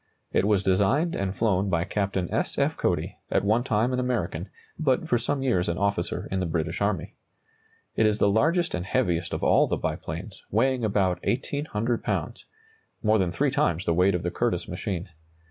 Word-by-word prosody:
It - - +3
was 100 -2 +2
designed 100 - +2
and 100 0 -2
flown 100 -3 +1
by 85 -2 +1
Captain 95 -2 -1
S. - - -1
F. - - +1
Cody, - - -1
at - - +1
one 110 +4 +2
time 115 +1 +1
an 125 - 0
American, 110 -8 -2 0.3
but 150 0 +1
for 120 -5 +2
some 135 +3 -1
years 95 -10 +1
an 85 - -1
officer 100 -3 -1
in 95 - 0
the 90 - -1
British 80 +1 -2
army. 100 -5 -1 0.8
It 110 - +4
is 105 -1 +1
the 100 - +3
largest 160 - +2
and 90 - -2
heaviest 90 -6 0
of - - -3
all - - +4
the - - -1
biplanes, - - -5
weighing 125 +3 +1
about 100 -4 +1
1,800 120 -3 -1
lbs., - - -3 0.6
more 110 0 +4
than 95 -2 +1
three 85 - +1
times 85 +2 +1
the 85 - +2
weight 90 +3 +3
of 90 - -2
the - - -1
Curtiss - - -1
machine. 95 -1 -4
100 Hz, 190 wpm, -26 LUFS, 90-120 Hz, 0.8 s, It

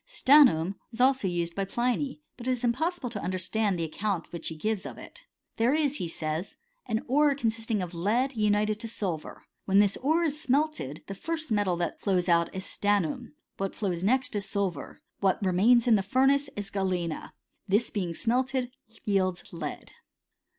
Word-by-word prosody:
StanA 295 - +7
num 170 -3 +1 0.2
is 230 - -10
also 260 -4 +3
used 170 -1 -1
by 195 - -1
Pliny; 250 +8 -1
but 245 0 -9
it - - +3
is 250 0 -5
impossible 265 +3 0
to 205 -4 -5
understand 185 +2 0
the 165 - -2
account 180 +2 -3
which 170 -2 -4
he 160 - -4
gives 210 +4 -2
of - - -8
it. - - -13 0.3
There 235 +5 +3
is, 295 -2 +1
he 175 - -3
says, 160 +3 -4 0.3
an 225 -1 -1
ore 285 +2 +4
consisting 225 -4 -1
of 180 0 -7
lead, 230 +10 0
united 210 0 +1
to 230 - -3
silver. 185 -8 -4 0.3
Wh^n 195 - +4
this 205 -1 +3
ore 315 +6 +2
is 305 -2 -1
smelted, 270 - 0
the 195 - -6
first 315 - -4
metal 205 -5 +1
that 170 -1 -3
flowt 185 -3 +1
out 170 -1 +3
is 190 0 -4
st - - -7 0.2
annum. 150 -1 -6 0.2
What 195 0 -3
flows 180 -4 -2
next 255 +3 +1
is 200 -2 -3
silver. 200 -4 -3 0.2
What 190 -2 +2
remains 220 +6 +4
in 225 -3 +6
the - - 0
furnace 270 +7 +2
is 205 -1 -5
galena. 180 -5 -2 0.3
This 210 +4 +2
being 180 -5 -2
smelted^ 250 +5 0 0.3
yields 185 -4 0
lead. 155 -4 -6
210 Hz, 185 wpm, -28 LUFS, 185-255 Hz, 0.3 s, StanA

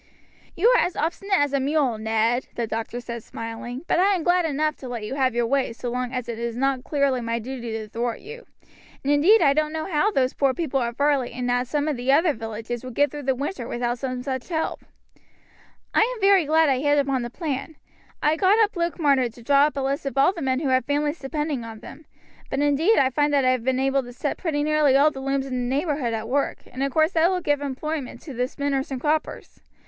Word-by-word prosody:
"You 385 +7 +3
are - - +5
as 355 - -2
obstinate 385 +5 0
as 290 -1 +1
a 280 - +2
mule, 270 -4 +1
Ned," 225 +3 0
the 235 - -1
doctor 225 +2 -4
said, 235 -1 -6
smiling; 230 +4 -7
"but - - +2
I 390 +2 +4
am 345 - -3
glad 350 0 +3
enough 305 0 0
to 260 - -9
let 240 -3 -5
you 210 - -4
have 260 -3 +1
your 240 0 +2
way 265 -1 0
so 240 +1 -5
long 250 0 -2
as 250 -2 -4
it 230 -1 -5
is 235 0 -3
not 270 -1 0
clearly 280 -4 +1
my 230 0 -2
duty 240 0 -6
to 220 -1 -4
thwart 235 +2 -3
you; 470 +3 -11 0.6
and 280 +2 +2
indeed 345 +9 +5
I 280 -2 +5
don't 305 +1 0
know 315 0 -3
how 355 +3 +1
those 265 -10 +1
poor 275 -2 +1
people 285 -6 -1
at 235 -1 -2
Varley 285 -3 +1
and 245 0 -2
at 245 0 0
some 295 +3 -1
of 300 -4 -1
the 250 +2 +1
other 315 +3 +4
villages 225 +1 -6
would 255 -2 -8
get 290 0 +3
through 295 - -6
the 265 -1 0
winter 270 -2 -4
without 240 0 -2
some 255 -1 -4
such 260 +1 -4
help." 320 -2 -2 1.1
"I - - +3 0.2
am - - -10
very 390 -4 +5
glad 320 +2 +4
I 265 -2 +2
hit 290 +1 +2
upon 275 -2 +1
the 240 - -4
plan. 300 +1 -4 0.5
I 305 +1 +3
got 415 +3 +3
Luke 340 -1 -1
Marner 275 -5 +3
to 235 +1 -15
draw 280 +3 +5
up 285 - -7
a - - 0
list 275 +1 -2
of 275 - -5
all 280 +7 +5
the 340 - -7
men 260 0 0
who 285 - 0
had 260 0 +3
families 295 +2 -1
depending 295 -2 -3
upon 225 -1 -9
them; 300 +3 -12 0.4
but 275 - -2
indeed 290 +9 +3
I 260 -1 +3
find 290 +3 +1
that 275 -2 +3
I 255 - +5
have 255 -3 -1
been 260 +1 +1
able 270 +1 +2
to 245 -1 -10
set 280 +4 -3
pretty 300 -5 -1
nearly 300 -3 +3
all 295 +2 +5
the 270 - -8
looms 275 0 -1
in 265 - -6 0.2
the 265 - 0
neighborhood 285 -6 -1
at 220 0 -5
work, 275 +3 -1
and 255 - -6
of 275 0 0
course 315 +4 +3
that 330 0 +3
will 370 -1 0
give 290 -3 0
employment 285 0 -4
to 290 - -9
the 250 +1 -1
spinners 275 0 -2
and 265 -2 -4
croppers. 305 +3 -2
275 Hz, 245 wpm, -24 LUFS, 245-305 Hz, 1.1 s, are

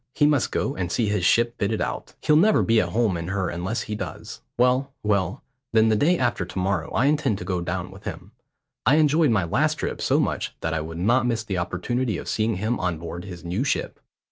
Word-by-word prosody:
He 145 - +4
must 145 -4 +2
go 135 - -1
and 90 -1 -3
see 110 -1 +1
his 105 -3 0
ship 120 +6 +2
fitted 105 +2 0
out. - - -4
He'll 150 - +3
never 205 +8 +5
be 115 -1 +4
at - - -2
home 110 -4 +1
in 85 0 -5
her 95 -1 -1
unless 90 +7 -3
he 105 - -5
does. 95 -7 -6 0.2
Well, 125 +3 +2
well, 100 -4 0 0.3
then 110 0 +5
the 110 - +3
day 170 +11 +3
after 120 - 0
to 90 +2 -8
morrow 95 -3 0
I 125 - +1
intend 145 -7 +2
to - - -7
go 90 -3 -1
down 90 +1 -3
with 95 +2 -14
him. 90 +4 -7 0.5
I 135 - +4
enjoyed 155 0 +4
my 105 -5 +2
last 145 - +1
trip - - -4
so - - +2
much - - -1
that 80 - -1
I 80 - -1
would 80 +1 -7
not 120 +8 +2
miss 115 -2 0
the 95 -4 -2
opportunity 110 +5 -1
of - - -7
seeing 110 0 0
him 110 +6 -1
on 90 -3 -1
board 85 +2 -7
his 90 -3 -9
new 90 +8 -1
ship. 140 - -2
105 Hz, 235 wpm, -24 LUFS, 90-125 Hz, 0.5 s, never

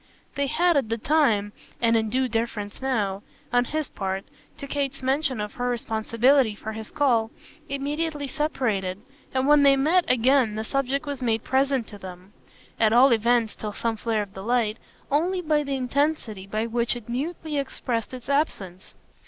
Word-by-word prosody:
They 280 -1 0
had 335 +3 +3
at 265 -6 0
the 230 - 0
time, 225 -7 +2 0.3
and 230 -1 +3
in 220 -1 +1
due 260 +3 +1
deference 225 -3 -3
now, 210 -7 -1 0.3
on 245 0 +4
his 310 +2 -2
part, 190 0 -4 0.3
to - - -7
Kate's 275 -1 -3
mention 265 -2 0
of 210 0 -4
her 245 0 -2
responsibility 230 +1 +2
for 220 +1 -6
his 220 0 -7
call, 240 -6 +2 0.4
immediately 290 +2 -2
separated, 225 -11 -1 0.3
and 260 0 0
when 295 +1 +6
they 280 -1 +6
met 320 +7 +3
again 250 -2 +3
the 220 - -2
subject 275 +4 -1
was 285 -2 -4
made 230 -2 0
present 265 -2 +1
to 205 - -10
them 185 +1 -10 0.5
at 220 -1 +4
all 255 +3 +7
events 230 0 +2
till 210 -1 -5
some 230 +1 -1
flare 220 -1 -1
of 195 -1 -13
new 190 - -6
light 230 0 +1 0.3
only 350 +6 +1
by 305 -3 +1
the 280 -1 -2
intensity 255 -6 -1
with 220 +2 -1
which 235 0 +1
it 240 -3 -9
mutely 295 +4 -3
expressed 240 -4 -3
its 255 -2 -9
absence. 200 - -2
245 Hz, 175 wpm, -25 LUFS, 220-280 Hz, 0.5 s, all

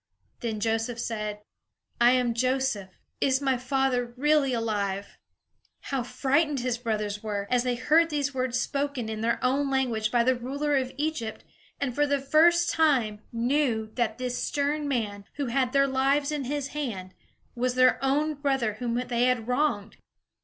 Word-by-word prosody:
Then 225 -3 -3
Joseph 225 +2 -1
said: 210 -3 -4 0.6
"I 240 +1 +6
am 250 -2 +2
Joseph; 255 -5 0 0.3
is 265 -1 +2
my 270 -2 +1
father 250 -1 0
really 295 0 +3
alive?" 205 -4 -2 0.6
How 270 -2 -2
frightened 280 +3 0
his 245 -1 -1
brothers 210 -3 -2
were, 205 -2 -3
as 250 -1 +3
they 250 0 0
heard 315 +7 +3
these 285 -2 -1
words 255 -1 -1
spoken 275 -3 -2
in 220 -1 -4
their 235 +1 +1
own 275 +2 +1
language 240 -5 0
by 235 0 +3
the 260 +2 +3
ruler 280 +4 -2
of 260 -1 0
Egypt 290 -7 -3 0.4
and 265 -3 -1
for 295 +3 +2
the 285 0 +2
first 335 +5 +4
time 250 -10 +2
knew 235 -2 0
that 230 -3 -1
this 250 -1 -3
stern 290 +1 -1
man, 210 -7 -2
who 285 - -2
had 255 +1 0
their 275 0 +4
lives 275 +2 +1
in 295 -3 -2
his 280 +1 -3
hand, 220 -12 -5 0.4
was 250 +1 -1
their 255 +1 +4
own 295 +3 +1
brother 270 -7 -1
whom 240 -2 -2
they 245 0 0
had 250 -3 +1
wronged! 250 -6 0
255 Hz, 165 wpm, -27 LUFS, 230-280 Hz, 0.6 s, I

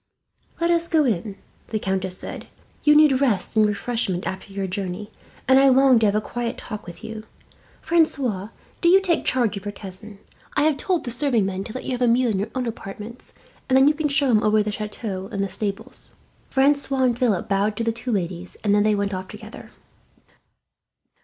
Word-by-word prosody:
"Let 340 0 +2
us 335 0 +2
go 315 -3 +3
in," 205 -3 -1 0.3
the 220 - -2
countess 190 -2 -2
said. - - -8 0.4
"You 300 0 +6
need 295 -3 +5
rest 230 -8 +1
and 215 -1 +5
refreshment 205 -3 -2
after 190 +1 -5
your 195 0 -3
journey, 190 +2 -4 0.4
and 265 +1 +6
I 275 0 +6
long 265 -2 +5
to 220 - +3
have 200 - +1
a 215 - +2
quiet 240 +2 -4
talk 210 -4 -7
with 170 -1 -10
you. 220 -1 -7 0.6
"Francois, 265 - +1 0.3
do 340 - +4
you 380 +2 +7
take 360 -4 0
charge 240 -5 +2
of 200 - -9
your 205 - -3
cousin. 200 +1 -8 0.4
I - - +4
have 305 -2 +2
told 360 +1 0
the 240 - -3
serving 240 -4 +2
men 190 0 -3
to 215 - -8
let 255 - -6
you - - -4
have 250 0 -3
a 245 - +4
meal 240 0 +3
in 195 - -1
your 205 +3 -2
own 255 -1 -1
apartments, 220 +1 -8 0.3
and 260 - +5
then 265 +1 +6
you 300 - +5
can 305 0 -1
show 280 -2 +2
him 215 -2 +4
over 215 0 +3
the 210 - -2
chateau 210 -2 -5
and 200 - -1
the 195 - -2
stables." 200 +2 -3 0.3
Francois 275 -1 +2
and 245 -2 +1
Philip 225 -8 +1
bowed 205 +1 0
to 230 - -1
the 230 - +1
two 235 +2 -4
ladies, 180 -3 -3
and 205 -2 +2
then 210 0 +3
went 200 0 -1
off 185 0 -4
together. - - -11
220 Hz, 210 wpm, -23 LUFS, 200-265 Hz, 0.6 s, you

